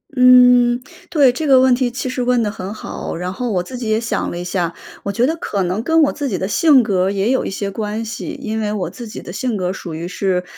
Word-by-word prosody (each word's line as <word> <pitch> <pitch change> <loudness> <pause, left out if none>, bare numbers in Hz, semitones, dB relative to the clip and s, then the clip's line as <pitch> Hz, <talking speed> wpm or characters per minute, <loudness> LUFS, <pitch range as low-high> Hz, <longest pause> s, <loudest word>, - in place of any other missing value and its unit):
嗯， 250 -1 +6 0.3
对， 280 -6 +4
这 305 +4 -3
个 265 -2 +6
问 260 -1 +5
题 245 0 +1
其 250 +1 -5
实 255 0 -3
问 245 -1 +2
得 210 - -1
很 195 -1 -6
好。 215 - -6
然 180 +2 -4
后 245 +2 -3
我 180 -2 0
自 255 - -9
己 230 -3 -4
也 215 +1 +2
想 230 - -2
了 175 - -5
一 175 - -4
下， 175 -2 -2 0.3
我 200 - -2
觉 240 +4 +1
得 320 - 0
可 200 - -2
能 185 +5 -1
跟 325 +6 +2
我 285 - +2
自 290 -2 -3
己 190 - -2
的 190 - -2
性 280 - +4
格 190 -3 +1
也 200 +4 0
有 260 - +1
一 - - -3
些 200 +1 -4
关 215 +2 -4
系。 230 +2 -6
因 220 +1 -3
为 210 -1 -1
我 185 -5 -2
自 235 +4 -9
己 - - -8
的 175 - -9
性 225 +1 -2
格 180 0 -2
属 170 -4 -7
于 170 +2 -5
是， 180 -1 -1
220 Hz, 290 characters per minute, -18 LUFS, 190-250 Hz, 0.3 s, 嗯